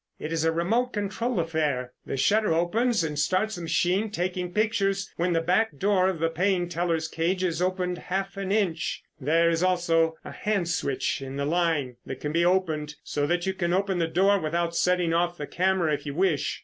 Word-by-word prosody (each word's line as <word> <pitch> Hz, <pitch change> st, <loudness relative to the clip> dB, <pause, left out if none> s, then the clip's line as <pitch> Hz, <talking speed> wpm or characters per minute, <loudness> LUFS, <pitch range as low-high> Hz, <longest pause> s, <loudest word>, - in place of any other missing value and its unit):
It 155 Hz, -, -5 dB
is 160 Hz, -1 st, 0 dB
a 165 Hz, -, +3 dB
remote 225 Hz, +10 st, 0 dB
control 210 Hz, +2 st, -2 dB
affair. 150 Hz, -6 st, -1 dB
The -, -, -3 dB
shutter 210 Hz, +9 st, +3 dB
opens 215 Hz, +5 st, +1 dB
and 150 Hz, -2 st, -2 dB
starts 185 Hz, +8 st, +1 dB
the -, -, -6 dB
machine 180 Hz, +6 st, +1 dB
taking 180 Hz, -2 st, -2 dB
pictures 200 Hz, -1 st, 0 dB
when 175 Hz, +2 st, 0 dB
the 165 Hz, -, +2 dB
back 180 Hz, 0 st, +1 dB
door 190 Hz, +1 st, +3 dB
of 190 Hz, -, -2 dB
the 165 Hz, +1 st, +1 dB
paying 180 Hz, +1 st, +1 dB
teller's 165 Hz, -2 st, -1 dB
cage 175 Hz, +4 st, -1 dB
is 175 Hz, -2 st, -1 dB
opened 180 Hz, -1 st, -1 dB
half 195 Hz, +1 st, -3 dB
an 195 Hz, -1 st, -3 dB
inch. 185 Hz, -6 st, 0 dB, 0.2 s
There 160 Hz, +4 st, +3 dB
is 165 Hz, 0 st, 0 dB
also 170 Hz, -3 st, +2 dB
a -, -, -7 dB
hand 200 Hz, -5 st, -1 dB
switch 140 Hz, -6 st, -1 dB
in 135 Hz, 0 st, -6 dB
the 140 Hz, 0 st, -1 dB
line 155 Hz, -6 st, 0 dB
that 130 Hz, -, -5 dB
can 150 Hz, -, -3 dB
be 170 Hz, +2 st, +2 dB
opened 160 Hz, -5 st, +1 dB
so 145 Hz, -1 st, -1 dB
that 175 Hz, +2 st, 0 dB
you 190 Hz, -, 0 dB
can 175 Hz, -2 st, -1 dB
open 190 Hz, -1 st, 0 dB
the 165 Hz, -, +1 dB
door 195 Hz, +4 st, +3 dB
without 170 Hz, +1 st, -1 dB
setting 180 Hz, -1 st, +2 dB
off 175 Hz, +1 st, +1 dB
the 145 Hz, -, -4 dB
camera, 180 Hz, -2 st, +1 dB
if 150 Hz, -, -4 dB
you 140 Hz, -, -4 dB
wish. 175 Hz, -5 st, 0 dB
175 Hz, 205 wpm, -26 LUFS, 160-190 Hz, 0.2 s, a